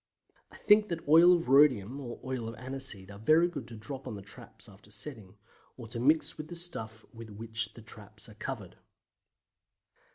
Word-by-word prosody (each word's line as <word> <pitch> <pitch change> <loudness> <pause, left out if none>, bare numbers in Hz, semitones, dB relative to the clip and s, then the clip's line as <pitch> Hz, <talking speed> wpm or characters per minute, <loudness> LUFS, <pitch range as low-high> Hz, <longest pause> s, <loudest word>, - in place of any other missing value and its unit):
I - - -14
think 210 0 +4
that 165 -3 -5
oil 165 +4 +8
of 170 - -2
rhodium 130 -3 +4
and 120 -4 -7
oil 130 -3 -3
of 115 - -8
aniseed 130 -6 -3
are 100 - -11
very 155 +9 +4
good 175 - -7
to 115 - -10
drop 135 +4 -7
on 115 - -5
the 100 - -9
traps 115 +4 -11
after 100 0 -17
setting, 105 -2 -4 0.4
or 120 -3 -9
to 115 - -5
mix 155 +5 +2
with 155 - -6
the 175 - -8
stuff 115 -11 -4
with 115 -1 -10
which 115 +2 -5
the 115 - -12
traps 110 -2 -9
are - - -13
covered. - - -7
120 Hz, 190 wpm, -30 LUFS, 110-150 Hz, 0.4 s, oil